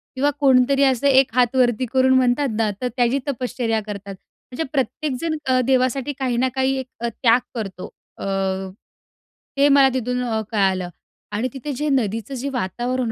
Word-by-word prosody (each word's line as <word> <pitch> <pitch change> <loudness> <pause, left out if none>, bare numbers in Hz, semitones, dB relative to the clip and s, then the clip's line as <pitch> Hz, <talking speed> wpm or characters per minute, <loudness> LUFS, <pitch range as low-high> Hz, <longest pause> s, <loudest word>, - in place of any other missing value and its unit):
किंवा 275 +3 +2
कोणीतरी 270 0 +4
असं 265 0 +2
एक 265 -3 +4
हात 250 0 +2
वरती 250 -1 +2
करून 260 0 +4
म्हणतात 260 +2 +2
ना. 225 -1 +1
तर 250 - 0
त्याची 245 +2 +2
तपश्चर्या 245 -4 -1
करतात. 200 -1 -7
म्हणजे 250 +8 -9
प्रत्येकजण 300 +3 -2
अ, 255 -1 +2
देवासाठी 260 +1 +1
काही 255 -3 -1
ना 255 +2 +2
काही 265 0 +1
एक 260 - -6 0.2
त्याग 235 +1 +2 0.2
करतो. 195 -5 -5 0.3
अ, - - -6 1.3
ते 280 +1 +5
मला 275 -1 +6
तिथून 250 0 -1
अ, 225 -3 -1
कळालं 190 -4 +1 0.4
आणि 220 +5 -1
तिथे 275 +2 -5
जे 295 +4 -2
नदीचं 230 -3 -1
जे 265 +2 -3
वातावरण 245 +1 -2
255 Hz, 160 wpm, -21 LUFS, 230-270 Hz, 1.3 s, मला